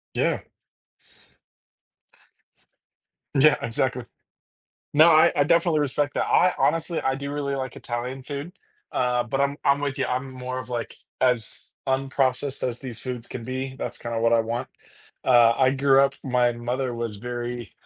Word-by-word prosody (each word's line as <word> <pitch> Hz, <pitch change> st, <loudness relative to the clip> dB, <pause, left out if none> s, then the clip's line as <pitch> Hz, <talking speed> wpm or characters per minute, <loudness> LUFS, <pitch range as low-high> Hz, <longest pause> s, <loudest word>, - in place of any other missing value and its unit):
Yeah. -, -, +1 dB, 3.0 s
Yeah, 150 Hz, +2 st, +6 dB
exactly. 125 Hz, +1 st, -1 dB, 0.9 s
No, 155 Hz, +3 st, +7 dB
I 155 Hz, -1 st, +6 dB
I 145 Hz, -, +4 dB
definitely 170 Hz, 0 st, +3 dB
respect 145 Hz, 0 st, -1 dB
that. -, -, 0 dB
I 180 Hz, +1 st, +4 dB
honestly, 165 Hz, +1 st, +1 dB
I 135 Hz, -, 0 dB
do 140 Hz, +1 st, -5 dB
really 140 Hz, -1 st, -2 dB
like 130 Hz, -2 st, -4 dB
Italian 125 Hz, +2 st, -5 dB
food, 145 Hz, +5 st, -6 dB, 0.4 s
uh, 125 Hz, -1 st, +1 dB
but 135 Hz, +3 st, -2 dB
I'm 140 Hz, 0 st, +1 dB
I'm 140 Hz, +1 st, +3 dB
with 140 Hz, -2 st, -2 dB
ya, -, -, 0 dB
I'm 130 Hz, +1 st, -4 dB
more 130 Hz, 0 st, -5 dB
of, 125 Hz, -2 st, -7 dB
like, 120 Hz, -1 st, -4 dB, 0.3 s
as 125 Hz, -3 st, 0 dB, 0.2 s
unprocessed 135 Hz, 0 st, 0 dB
as 120 Hz, -1 st, -3 dB
these 120 Hz, -5 st, -7 dB
foods 125 Hz, -1 st, -5 dB
can 115 Hz, -, -7 dB
be, 130 Hz, +2 st, -4 dB
that's -, -, -5 dB
kind 115 Hz, 0 st, -5 dB
of 115 Hz, -, -1 dB
what 115 Hz, 0 st, +3 dB
I 115 Hz, -, +5 dB
want. 115 Hz, +2 st, -3 dB, 0.6 s
Uh, 120 Hz, -2 st, +6 dB
I 130 Hz, -1 st, +4 dB
grew 135 Hz, 0 st, +4 dB
up 140 Hz, 0 st, +3 dB
my 125 Hz, -2 st, +2 dB
mother 120 Hz, +2 st, -3 dB
was 115 Hz, -3 st, -4 dB
very, 120 Hz, +1 st, -5 dB
130 Hz, 160 wpm, -25 LUFS, 120-140 Hz, 3.0 s, No